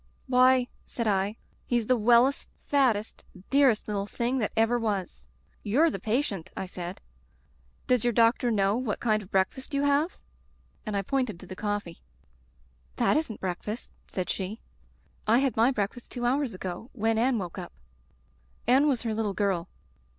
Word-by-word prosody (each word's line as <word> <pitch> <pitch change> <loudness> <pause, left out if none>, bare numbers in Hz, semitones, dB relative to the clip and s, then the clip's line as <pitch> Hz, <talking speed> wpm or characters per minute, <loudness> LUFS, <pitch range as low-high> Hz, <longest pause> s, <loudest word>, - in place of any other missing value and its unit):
"'Why/ 255 -1 +4 0.2
said 235 -2 -4
I, 200 +1 +1 0.3
*he's 240 -2 +1
the 255 - +3
wellest, 240 +4 +3
fattest, 245 -7 0 0.3
dearest 270 -6 +4
little 200 -1 -2
thing 240 +4 -1
that 215 - -1
ever 225 +2 +3
was! 195 - -3 0.4
Tou're 290 +11 +3
the 195 - -4
patient/ 215 - -1
I - - -2
said. 180 0 -6 0.9
*Does 250 -3 +2
your 240 - +3
doctor 230 +2 +3
know 200 -2 +2
what 245 -4 -2
kind 215 -2 +1
of 190 - -13
breakfast 205 +9 -1
you 280 - +1
have?' 285 +5 +2 0.7
And 210 -1 -1
I 195 - 0
pointed 250 -5 -1
to - - -10
the 185 - -8
coffee. 205 -4 -3 1.0
"'That - - +2
isn't 300 -9 -2
breakfast/ 190 +5 -4 0.2
said 185 -2 -3
she. 195 +3 -4 0.7
*I 225 +2 +5
had 270 -1 +1
my 230 +3 +4
breakfast 230 0 -3
two 245 -1 -3
hours 260 -2 +1
ago, 185 +5 -6
when 225 -1 +1
Anne 250 +1 +2
woke 180 -5 -5
up.' - - -8 0.9
Anne 265 +5 +5
was 260 -6 +1
her 225 -2 -1
little 215 -3 -1
girl. 190 -4 0
225 Hz, 165 wpm, -28 LUFS, 200-255 Hz, 1.0 s, I